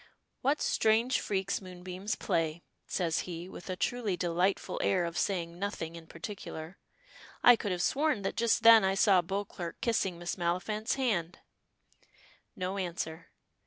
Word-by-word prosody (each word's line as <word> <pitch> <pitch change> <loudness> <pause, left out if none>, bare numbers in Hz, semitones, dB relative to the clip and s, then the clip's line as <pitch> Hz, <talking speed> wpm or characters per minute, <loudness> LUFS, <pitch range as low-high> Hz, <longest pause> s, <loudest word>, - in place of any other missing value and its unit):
"What 280 +4 +1
strange 225 +4 +3
freaks 195 0 -1
moonbeams 185 +2 -5
play," 165 0 -1 0.2
says 170 -3 0
he, 170 0 -6
with 185 - -10
a 185 - -1
truly 215 -1 -1
delightful 180 +3 0
air 185 -3 +2
of 170 0 -5
saying 175 -3 -1
nothing 170 -5 -3
in 165 -1 -11
particular. 165 -1 -7 0.6
"I 245 - +9
could 205 -3 -3
have 180 0 -1
sworn 285 -7 +1
that 195 - -2
just 230 0 +2
then 225 -2 +9
I 190 0 +2
saw 195 -2 +5
Beauclerk 190 -1 -5
kissing 195 -6 0
Miss 175 +2 -4
Maliphant's 185 +6 -1
hand." 200 -11 0 1.2
No 185 +2 -3
answer. 165 -2 -4
185 Hz, 145 wpm, -31 LUFS, 170-210 Hz, 1.2 s, I